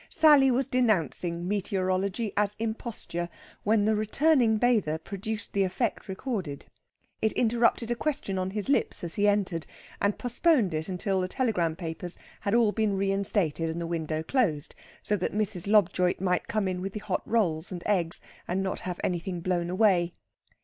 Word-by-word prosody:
Sally 295 -4 +6
was 255 +1 +1
denouncing 180 -8 0
meteorology 195 +1 -1
as 210 0 +2
imposture 220 -6 -4 0.3
when 210 -1 +2
the 220 - +3
returning 230 +2 +3
bather 215 -10 +2
produced 205 +5 -6
the 200 - +2
effect 205 +4 -2
recorded. 190 - -4 0.6
It 220 - +1
interrupted 235 0 +2
a - - +1
question 265 -8 -2
on 185 0 -1
his 205 +1 -3
lips 275 - 0
as 170 -2 -4
he 205 0 +2
entered, 195 -5 0 0.3
and 200 0 +1
postponed 245 - +3
it 155 +3 -3
until 190 +1 -1
the 185 - -1
telegram 185 -8 0
papers 170 0 -5 0.2
had 200 +2 0
all 230 -3 +4
been 210 -2 0
reinstated 195 -5 +1
and 160 +1 -3
the 170 - -3
window 160 -2 -2
closed, 165 - 0 0.3
so 210 - +1
that 185 - -2
Mrs. 205 -4 -1
Lobjoit 185 -3 +3
might 180 -1 0
come 215 -3 0
in 180 -1 -2
with 195 +1 -4
the 210 - -4
hot 200 -3 -2
rolls 180 -8 0
and 175 -2 -6
eggs 180 -5 +1 0.3
and 190 +2 -1
not 190 - -2
have 180 -1 -5
anything 175 0 -2
blown 175 0 -1
away. 180 -3 +2
195 Hz, 170 wpm, -28 LUFS, 175-220 Hz, 0.6 s, Sally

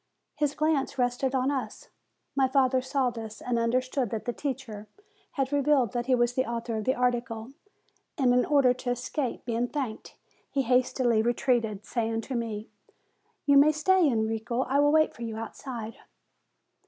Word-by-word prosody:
His 295 -1 0
glance 305 -3 0
rested 250 +2 0
on 260 +2 +1
us. 255 -6 -5 0.5
My 270 -1 +3
father 260 -1 +2
saw 260 -1 0
this, 220 -2 -8
and 240 -1 -1
understood 255 +2 0
that 220 0 -4
the 240 - -2
teacher 250 -7 -5 0.5
had 270 -1 -1
revealed 280 -4 +3
that 240 0 -3
he 260 - +4
was 240 0 +1
the 260 - +1
author 235 -1 -4
of 215 - -4
the 260 - +2
article; 240 -1 -1 0.7
and 255 -4 +3
in 250 0 +4
order 275 -4 +4
to 250 0 -5
escape 245 +2 -3
being 235 0 0
thanked, 255 -6 -5 0.3
he 275 -1 0
hastily 250 -2 +2
retreated, 230 -3 0
saying 225 -1 -1
to 265 - -7
me: 225 -2 -3 0.8
"You 285 -1 +5
may 300 +2 +6
stay, 340 +3 +3
Enrico; 225 +1 -1
I 270 +2 +1
will 290 0 +4
wait 310 0 +3
for - - -14
you 225 -2 -4
out 225 -1 -6
side." 230 -4 -7
250 Hz, 170 wpm, -28 LUFS, 230-270 Hz, 0.8 s, may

